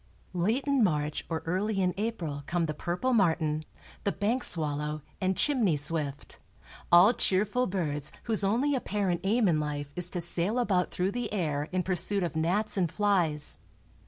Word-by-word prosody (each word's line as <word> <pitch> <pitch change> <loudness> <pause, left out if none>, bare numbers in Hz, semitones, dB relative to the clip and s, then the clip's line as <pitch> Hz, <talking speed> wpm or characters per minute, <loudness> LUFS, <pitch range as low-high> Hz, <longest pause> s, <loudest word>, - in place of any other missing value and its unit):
Late 215 +10 0
in 280 -4 +2
March 150 -5 0
or 160 -1 -3
early 195 +5 -1
in 180 -1 +1
April 185 -10 -3
come 175 -1 0
the 155 - -3
purple 180 +12 -2
martin, 160 -7 +1 0.4
the 200 - +1
bank 215 +7 -1
swallow 150 -2 0 0.2
and 185 0 0
chimney 230 - +2
swift, 145 -1 -1 0.5
all 180 +7 +7
cheerful 210 +5 +1
birds 150 -6 -2
whose 220 -3 +1
only 240 +9 +1
apparent 200 -8 -1
aim 215 +3 +2
in 160 -4 +2
life 145 -1 -4
is 180 0 +1
to 180 - -3
sail 175 +6 +1
about 195 -7 +1
through 185 +2 -1
the 245 0 -4
air 150 -7 -2
in 185 0 0
pursuit 185 +2 +1
of 170 - -3
gnats 200 +7 0
and 175 -4 +1
flies. 175 -8 0
180 Hz, 165 wpm, -29 LUFS, 155-210 Hz, 0.5 s, all